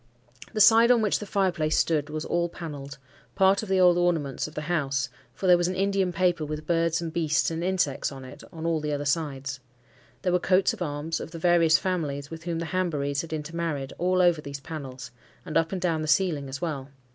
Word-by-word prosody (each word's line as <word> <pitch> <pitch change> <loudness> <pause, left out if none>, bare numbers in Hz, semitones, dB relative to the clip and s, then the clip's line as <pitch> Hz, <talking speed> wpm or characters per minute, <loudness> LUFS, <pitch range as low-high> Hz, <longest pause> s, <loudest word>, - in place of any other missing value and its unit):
The 215 - -2
side 230 +2 +7
on 240 -3 +5
which 210 - +1
the 210 - -7
fire 195 -1 +1
place 155 -2 0
stood 155 -2 +1
was 155 +1 -4
all 170 0 0
panelled,—part 150 +5 -2
of 215 - -7
the 190 -1 +2
old 180 -1 +5
ornaments 160 -7 0
of 155 - -13
the 150 - -3
house, 140 -4 -1 0.3
for - - -5
there 180 -1 +6
was 175 - +1
an 185 - -2
Indian 195 -1 +1
paper 175 -2 +1
with 155 0 -5
birds 165 0 +1
and 165 -1 -5
beasts 160 -2 +1
and 165 +1 -3
insects 175 -8 0
on 135 -1 -9
it, 130 - -11
on 160 -1 -7
all 165 -1 +1
the 150 0 -2
other 145 0 -3
sides. 140 -3 -2 0.6
There 180 - +1
were 180 - +3
coats 185 +1 +3
of - - -10
arms, 150 0 -2
of - - -6
the 165 - -8
various 165 -2 +4
families 145 -5 -3
with 165 +1 -8
whom 170 -2 -2
the 165 - -3
Hanburys 145 -6 0
had 165 - -10
intermarried, 155 -3 -3
all 185 +1 +2
over 175 -3 +3
these 140 -1 -7
panels, 135 -4 -8 0.3
and 165 - -6
up 165 0 +2
and 190 - -2
down 170 -3 0
the 155 - -3
ceiling 155 -5 +1
as 135 +2 -5
well. 145 -5 -4
165 Hz, 225 wpm, -26 LUFS, 145-180 Hz, 0.6 s, side